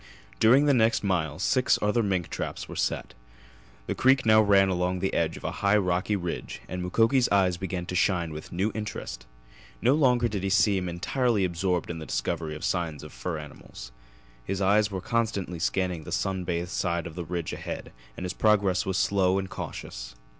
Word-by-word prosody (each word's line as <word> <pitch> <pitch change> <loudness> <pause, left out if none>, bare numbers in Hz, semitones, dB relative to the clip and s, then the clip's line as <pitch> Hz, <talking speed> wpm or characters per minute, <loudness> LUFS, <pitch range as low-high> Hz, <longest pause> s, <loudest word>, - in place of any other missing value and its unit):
During 130 +6 +6
the 145 - +4
next 115 -3 +3
mile 80 -6 0
six 125 +7 +2
other 105 +3 +2
mink 95 -5 -1
traps - - -4
were - - -8
set. - - -2 0.7
The - - -2
creek 130 0 +3
now 110 0 +6
ran 100 -2 +5
along 90 0 0
the 95 +1 -1
edge - - 0
of - - -12
a - - -2
high 100 +1 +4
rocky 90 +1 0
ridge 90 -3 -4
and 90 +1 -4
Mukoki's 115 +8 +2
eyes 95 -3 +3
began 90 -1 -4
to 90 - -6
shine 90 -3 +1
with 75 - -8
a - - -7
new 100 +5 +1
interest. - - -6 0.5
No 125 - +3
longer 125 -5 +3
did 105 -4 -3
he 95 - -1
seem 95 -2 +2
entirely 105 +4 0
absorbed 90 -1 -1
in 85 - -6
the 80 - -8
discovery 80 -3 -2
of 75 - -5
signs 85 -5 -2
of 75 - -10
fur 80 +8 -4
animals. - - -10 0.5
His 95 +6 -3
eyes 105 +2 +3
were 95 -2 -4
constantly 100 -5 -1
scanning 90 -1 -1
the - - -9
sun 95 -2 -1
bathed 85 0 -2
side 85 -2 -1
of 85 - -7
the 85 +1 -5
ridge 85 -1 -4
ahead - - -6 0.3
and - - -5
his 90 0 -3
progress 100 -4 +2
was 95 -1 0
slow 95 -1 +2
and 95 -1 -3
cautious. - - -7
95 Hz, 195 wpm, -27 LUFS, 85-105 Hz, 0.7 s, During